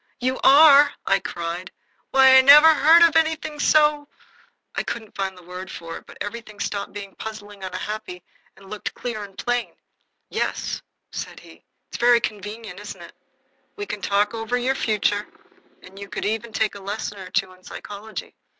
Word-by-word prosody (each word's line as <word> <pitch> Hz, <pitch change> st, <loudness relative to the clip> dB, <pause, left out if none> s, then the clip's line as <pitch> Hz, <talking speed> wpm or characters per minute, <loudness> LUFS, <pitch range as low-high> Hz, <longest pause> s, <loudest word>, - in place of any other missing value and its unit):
"You 255 Hz, +1 st, -1 dB
are!" 285 Hz, 0 st, +7 dB
I 195 Hz, 0 st, +3 dB
cried. 175 Hz, 0 st, -5 dB, 0.4 s
"Why, 265 Hz, -1 st, +6 dB
I 265 Hz, -, +9 dB
never 300 Hz, +4 st, +9 dB
heard 320 Hz, +3 st, +6 dB
of 335 Hz, -2 st, +4 dB
anything 315 Hz, -2 st, 0 dB
so 300 Hz, -1 st, +3 dB, 0.3 s
" -, -, -33 dB
I -, -, 0 dB
couldn't 220 Hz, -3 st, -6 dB
find 190 Hz, -1 st, -3 dB
the 180 Hz, -, -15 dB
word 180 Hz, +2 st, -8 dB
for 165 Hz, -3 st, -8 dB
it, -, -, -16 dB
but -, -, -14 dB
everything 215 Hz, 0 st, -7 dB
stopped 200 Hz, -1 st, -3 dB
being 200 Hz, -1 st, -8 dB
puzzling 205 Hz, -2 st, -9 dB
and 185 Hz, -, -5 dB
unhappy 185 Hz, -1 st, -6 dB, 0.3 s
and 195 Hz, 0 st, -16 dB
looked 210 Hz, +1 st, -6 dB
clear 235 Hz, -4 st, -5 dB
and 195 Hz, -1 st, -12 dB
plain. 245 Hz, -1 st, -2 dB, 0.5 s
"Yes," -, -, -3 dB, 0.3 s
said -, -, -7 dB
he. -, -, -17 dB, 0.2 s
"It's -, -, -6 dB
very 240 Hz, 0 st, +5 dB
convenient, 210 Hz, -2 st, -6 dB
isn't 205 Hz, 0 st, -9 dB
it? -, -, -13 dB, 0.6 s
We 410 Hz, -, -5 dB
can 210 Hz, -, -6 dB
talk 205 Hz, +2 st, +1 dB
over 225 Hz, +2 st, -2 dB
your 250 Hz, +2 st, 0 dB
future, 210 Hz, -4 st, 0 dB, 0.6 s
and 190 Hz, +1 st, -13 dB
you 200 Hz, 0 st, -9 dB
could -, -, -4 dB
even 220 Hz, +2 st, -2 dB
take 215 Hz, 0 st, 0 dB
a 200 Hz, -, -10 dB
lesson 205 Hz, +1 st, -5 dB
or 185 Hz, -1 st, -9 dB
two 195 Hz, -1 st, -1 dB
in 185 Hz, 0 st, -22 dB
psychology. 210 Hz, +3 st, -8 dB
215 Hz, 180 wpm, -23 LUFS, 195-260 Hz, 0.6 s, I